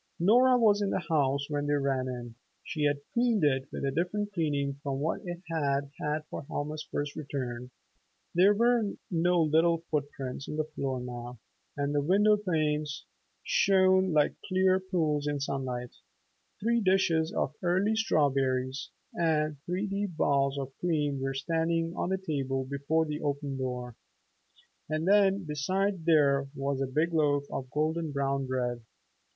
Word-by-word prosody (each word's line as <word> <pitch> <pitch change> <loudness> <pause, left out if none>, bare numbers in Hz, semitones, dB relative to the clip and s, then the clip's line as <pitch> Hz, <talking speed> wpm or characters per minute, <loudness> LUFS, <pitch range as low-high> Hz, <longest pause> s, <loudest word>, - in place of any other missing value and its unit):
Nora 250 +8 +5
was 210 -3 +4
in 200 - +1
the 180 - -2
house 140 -2 +1
when 145 -1 -2
they 145 - +2
ran 135 -2 0
in. 120 -2 -6 0.3
She 150 -3 -2
had 145 -1 +1
cleaned 235 -5 +2
it 135 -2 +2
with - - -4
a 135 - 0
different 205 +7 -2
cleaning 140 -5 -1
from 140 -2 -3
what 155 +3 -1
it 175 0 -6
had 140 -4 -1
had 150 +1 -2
for - - -6
Helma's 150 +2 -4
first 145 0 -3
return. 125 -5 -5 0.6
There 190 +4 +5
were 235 -2 +2 0.2
no 175 +1 +2
little 165 +2 +3
foot 145 -2 0
prints 135 -1 -6
on - - -4
the 155 - 0
floor 140 -4 -3
now, 120 0 -7 0.4
and 145 0 -1
the 145 - +2
window 205 +7 +4
panes 155 -7 -1 0.4
shone 190 -1 +4
like 150 -2 +3
clear 185 0 +3
pools 160 -6 -1
in 145 -1 -1
sunlight. 130 -3 -3 0.7
Three 235 +2 +1
dishes 180 -4 +2
of - - -1
early 190 +5 +2
strawberries 135 -9 +1 0.2
and 155 -3 +1
three 180 +4 -1
deep 200 -4 -3
bowls 140 0 +2
of 135 -1 -5
cream 150 -5 0
were 135 0 -2
standing 165 +3 0
on - - -2
the 190 - +1
table 135 -7 -2
before 140 +4 0
the 150 -1 -4
open 145 -1 -2
door. 125 -2 -4 0.9
And 155 +2 -1
then 200 -1 +4
besides 185 +5 -1
there 140 -4 +4
was 135 0 -2
a 135 - 0
big 155 +6 0
loaf 145 -3 +2
of 130 -1 -4
golden 155 +2 -1
brown 140 -1 -1
bread. 125 -2 -2
150 Hz, 160 wpm, -29 LUFS, 140-180 Hz, 0.9 s, Nora